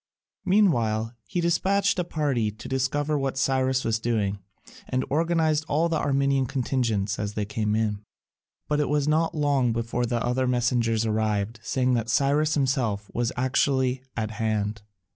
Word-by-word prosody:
Meanwhile 120 - +2
he 175 - -1
despatched 190 +3 +2
a - - +2
party 145 -10 0
to 105 +1 -10
discover 145 +3 0
what 135 -1 -2
Cyrus 130 0 +1
was 115 0 +1
doing, 105 -4 -1 0.5
and 130 0 0
organised 160 0 +2
all 160 +4 +1
the 160 - 0
Armenian 140 -1 +1
contingents 115 -7 -1
as 105 0 -3
they 105 - -1
came 105 0 -1
in. 105 -2 -1 0.7
But 150 0 0
it 150 - 0
was 150 0 +1
not 160 +2 +1
long 140 -5 +2
before 115 +1 -2
other 125 +2 0
messengers 120 -2 +1
arrived, 110 0 -1
saying 130 +3 0
that 115 -1 -1
Cyrus 145 +5 +2
himself 125 -8 0
was 120 0 0
actually 130 0 +1 0.2
at 110 -1 -2
hand. 110 -2 -2
130 Hz, 150 wpm, -25 LUFS, 110-145 Hz, 0.7 s, Meanwhile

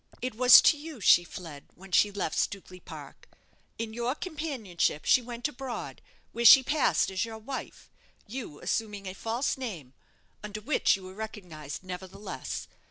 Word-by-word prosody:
"It 255 0 -3
was 250 +2 +8
to 300 - +5
you 310 -3 -9
she 175 -3 +6
fled 165 -5 -10
when 190 +1 -14
she 205 +2 +4
left 195 -6 -3
Stukely 185 -2 -3
Park - - -12 0.5
in 225 -1 -5
your 240 +3 -2
companionship 275 - -2
she 255 - +5
went 240 +2 -4
abroad, 265 -4 -7 0.3
where 235 - -3
she 265 +3 +10
passed 290 -7 +1
as 190 +2 -1
your 225 -1 -6
wife, 250 +5 -8 0.3
you 220 - -7
assuming 210 -3 -3
a 185 - -5
false 230 +8 -2
name 170 - -6 0.5
under 210 0 -6
which 230 +2 +2
you 195 - -10
were 185 0 -10
recognized, 185 -9 -8
nevertheless. 185 +2 -7
215 Hz, 160 wpm, -28 LUFS, 185-250 Hz, 0.5 s, she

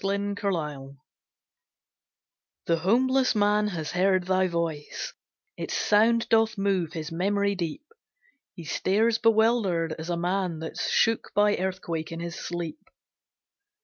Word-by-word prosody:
THE 200 +1 -1
CHURCH 205 - -10
ORGAN 150 -7 -3 1.7
The 165 - +2
homeless 255 +8 +2
man 210 0 +3
has 165 -6 -4
heard 185 +1 +2
thy 185 0 +2
voice, 165 -4 -3 0.4
Its - - -4
sound 225 +2 +3
doth 225 -1 +3
move 190 -4 0
his 160 -1 -5
memory 200 +4 +1
deep; 180 - -4 0.7
He 170 - -9
stares 215 +9 +1
bewildered, 220 -7 +2
as 160 +2 -6
a 175 - -1
man 180 -1 -1
That's 160 +1 -4
shook 225 0 +2
by 205 0 +4
earthquake 180 -4 -3
in 165 - -5
his 170 0 -5
sleep. 170 -2 -5
190 Hz, 130 wpm, -26 LUFS, 165-210 Hz, 1.7 s, by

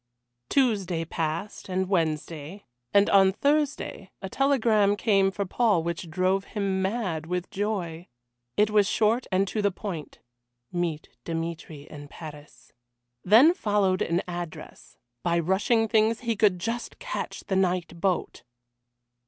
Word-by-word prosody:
Tuesday 200 -11 +1
passed, 165 +6 -4
and 185 0 0
Wednesday, 165 0 -2 0.3
and 200 0 +5
on 195 -1 +6
Thursday 280 -5 -1
a 190 - -6
telegram 225 -6 +3
came 200 -3 +3
for 200 +1 -3
Paul 200 -3 +2
which 170 0 -4
drove 185 +4 +1
him 195 -2 -2
mad 190 -6 -2
with 180 +2 -3
joy. 190 -5 -3 0.5
It 210 +1 +3
was 210 -2 +4
short 225 +4 +1
and 190 +1 +2
to 215 - -2
the 205 - +3
point: 180 -5 -6 0.5
"Meet 170 -3 -2
Dmitry 165 -3 -5
in 145 -1 -11
Paris," 150 -1 -12 0.5
Then 240 - +7
followed 205 - +1
an 170 +2 0
address. 175 -3 -8 0.2
By 170 -1 +1
rushing 195 +7 +2
things 220 0 +2
he 230 -2 -1
could 200 -3 +3
just 230 +6 -4
catch - - -5
the 195 - -3
night 180 -3 0
boat. 190 -3 -1
190 Hz, 135 wpm, -26 LUFS, 170-215 Hz, 0.5 s, Then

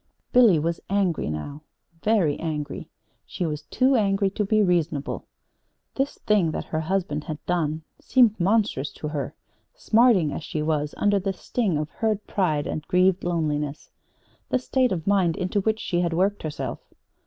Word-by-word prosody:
Billy 235 -9 +6
was 165 +2 -1
angry 190 - 0
now 75 - -5 0.4
very 200 -9 +2
angry. 150 -3 -4 0.3
She 180 - -4
was 150 -2 -3
too 255 - +2
angry 195 -3 +2
to 210 - -1
be 215 +1 +3
reasonable. 165 -6 -1 0.7
This 270 +1 -2
thing 205 -6 +3
that - - -3
her 155 - -2
husband 160 -3 -2
had 155 - -4
done 160 -3 -1 0.2
seemed 235 -5 +3
monstrous 190 -7 +1
to 150 - -5
her, 145 -3 -4 0.4
smarting, 215 - +3
as 155 - -5
she 155 0 -3
was, 150 -1 -1
under 205 -1 +2
the 195 0 -2
sting 195 -2 -1
of 150 0 -3
hurt 215 -2 -1
pride 155 -7 0
and 155 - -3
grieved 185 +1 +3
loneliness 150 -4 -2 0.6
the - - +2
state 255 0 +1
of 165 -4 -2
mind 190 -5 +2
into 190 +2 0
which 220 +2 0
she 175 - -1
had 170 -1 0
worked 195 +4 +1
herself. 155 -2 -4
180 Hz, 165 wpm, -25 LUFS, 155-205 Hz, 0.7 s, Billy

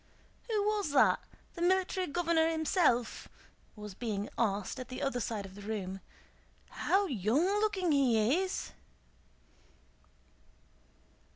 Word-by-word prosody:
"Who 425 -2 +1
was 415 -4 0
that? - - +5 0.3
The 340 - -8
Military 370 +1 +1
Governor 330 0 +2
himself?" 315 - +1 0.5
was 210 -2 -8
being 210 -1 -3
asked 205 +1 -1
at 255 - -6
the 255 - -6
other 275 -3 -1
side 215 -3 -3
of 190 - -11
the 205 - -11
room. 200 -3 -4 0.7
"How 400 +1 +1
young 245 - +1 0.2
looking 385 -5 +1
he 260 - +3
is!" 380 0 -3
275 Hz, 115 wpm, -32 LUFS, -, 0.7 s, that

